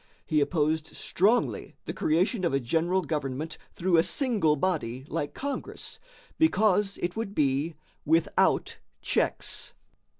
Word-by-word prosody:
He 155 -3 +2
opposed 155 0 +1
strongly 215 +7 +1
the - - -4
creation 185 +6 +1
of 165 -6 +2
a - - +3
general 170 +8 +1
government 150 0 -3
through 180 -1 +2
a - - +7
single 190 - +2
body 135 -7 -1
like 145 - -3
Congress, 280 0 -5 0.4
because 210 - +3
it 175 0 -1
would 220 -2 -4
be 145 +3 +1 0.3
without 165 +2 +2 0.2
checks. - - -1
165 Hz, 125 wpm, -28 LUFS, 150-195 Hz, 0.4 s, a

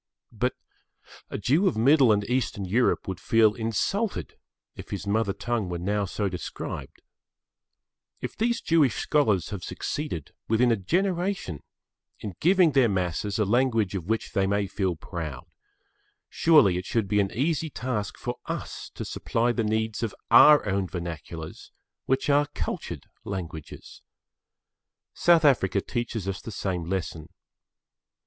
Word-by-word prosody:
But - - -1 0.7
a - - -4
Jew 150 - +2
of 175 - 0
Middle 130 +1 +5
and 105 -1 +2
Eastern 120 -5 -1
Europe 115 +7 +1
would 95 -2 -4
feel 110 -2 +4
insulted 125 - -1 0.4
if - - -10
his - - -5
mother 105 0 +1
tongue 115 -2 -2
were 90 - -3
now 100 +4 -1
so 100 +2 -2
described. 90 -3 -6 1.2
If - - -5
these 235 +2 0
Jewish 155 -8 +3
scholars 110 - +1
have 100 -4 -5
succeeded, 145 - -4 0.2
within 120 +2 +3
a - - +4
generation, 175 - -1 0.6
in 105 - -6
giving 180 -1 +5
their 135 -4 +4
masses 95 +1 -1
a 105 - +2
language 115 -2 +2
of 90 -3 -4
which 110 +1 -1
they 95 -1 +1
may 100 +1 +1
feel 95 -2 -1
proud, 80 -6 -6 0.8
surely 145 - +5
it 90 - -8
should 115 -4 0
be 105 +2 +2
an 100 -1 +1
easy 155 +5 0
task 125 -7 -3
for - - -4
us - - -5
to - - -5
supply 120 +1 0
the 115 -1 -1
needs 110 0 -1
of 115 -4 -2 0.2
our 150 -6 +8
own 95 -1 0
vernaculars 85 -2 -7 0.4
which 130 0 +1
are 145 0 +3
cultured - - -4 0.2
languages. 85 -6 -7 1.1
South 170 -2 +4
Africa 105 -9 +3
teaches 115 -2 -4
us 95 -1 -3
the - - -8
same 95 -5 -3
lesson. 80 -3 -4
110 Hz, 145 wpm, -26 LUFS, 95-130 Hz, 1.2 s, our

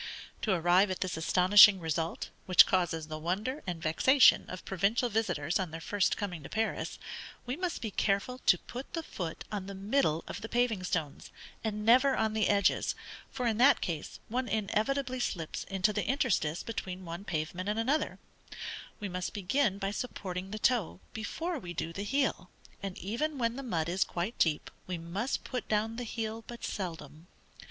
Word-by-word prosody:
To 215 - +1
arrive 180 +2 +4
at 185 - -3
this 185 -1 -1
astonishing 185 +4 +7
result, 160 0 -2 0.2
which 185 - +9
causes 170 -4 0
the 155 0 -5
wonder 205 - -2
and 175 -2 -3
vexation 205 - +5
of 185 - -7
provincial 200 +6 +1
visitors 180 -8 0
on 185 -3 -2
their 165 +1 -6
first 200 +4 +1
coming 180 -6 -4
to 140 - -9
Paris, 220 +1 -2 0.5
we 250 +2 -2
must 355 -3 -3
be 220 - -2
careful 200 +7 0
to 180 - +7
put 250 +9 -8
the 330 - -2
foot 170 - -5
on 200 -2 -3
the 200 - -6
middle 195 - +1
of - - -6
the 225 - -6
paving 240 -5 +1
stones, 160 -5 -3 0.3
and 210 -1 -2
never 255 +4 +6
on 220 -1 +1
the 215 -2 +2
edges, 200 -1 +2 0.3
for, 250 - -3
in 225 -2 +1
that 270 +3 +6
case, 160 -4 -4
one 250 +3 -1
inevitably 255 +6 0
slips 165 -9 -3
into 195 +2 +1
the - - -1
interstice 230 - +1
between 190 -5 -5
one 170 +3 -6
pavement 175 +2 -3
and 210 - 0
another: 270 +7 0 0.8
we 210 - -3
must 180 -1 -4
begin 205 +2 +1
by 195 -1 -2
supporting 190 -5 -4
the 215 - -4
toe, 220 -6 +1
before 320 - -3
we 175 -6 -7
do 165 0 -3
the 200 - -4
heel; 260 -5 0 0.3
and 195 -2 -5
even 275 +10 -2
when 230 -2 0
the 275 - -5
mud 170 -11 -1
is 180 +3 +2
quite 180 +7 -4
deep, 155 -3 +1 0.2
we 180 -1 -2
must 185 +10 -3
put 250 -3 -4
down 220 +2 0
the 245 - -3
heel 225 0 -4
but 240 -1 -9
seldom. 165 -4 -6
200 Hz, 180 wpm, -31 LUFS, 180-235 Hz, 0.8 s, which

